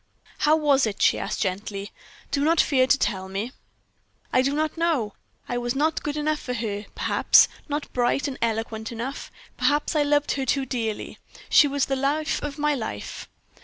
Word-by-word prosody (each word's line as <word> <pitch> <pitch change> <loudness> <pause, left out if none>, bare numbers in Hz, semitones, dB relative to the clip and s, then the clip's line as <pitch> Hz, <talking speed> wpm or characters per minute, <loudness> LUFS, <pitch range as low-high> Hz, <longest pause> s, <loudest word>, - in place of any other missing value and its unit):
"How 300 +1 +4
was 285 -5 +3
it?" 205 - -5
she - - +3
asked, - - -3
gently. 200 +1 -3 0.4
"Do 280 - +1
not 325 +2 +3
fear 260 -3 +4
to 285 - +4
tell 190 -6 -2
me." 200 +6 -3 0.8
"I 255 - +5
do 270 +2 +1
not 305 +1 -1
know; 320 -11 0 0.3
I 245 - -2
was 240 +1 -2
not 310 +3 +1
good 295 0 -3
enough 300 0 0
for 250 - -4
her, 210 -3 -3
perhaps - - +5 0.2
not 295 +1 -3
bright 250 +4 +1
and 270 - -6
eloquent 225 0 -2
enough. 240 +4 -5 0.3
Perhaps 295 +2 +1
I 305 - +4
loved 290 0 +2
her 270 -1 -1
too 275 -1 +1
dearly. 230 -4 -4 0.3
She 295 - +7
was 280 -1 0
the 270 - -1
life 290 +4 0
of 295 0 -5
my 300 0 +1
life. 220 - -5
270 Hz, 185 wpm, -25 LUFS, 225-295 Hz, 0.8 s, She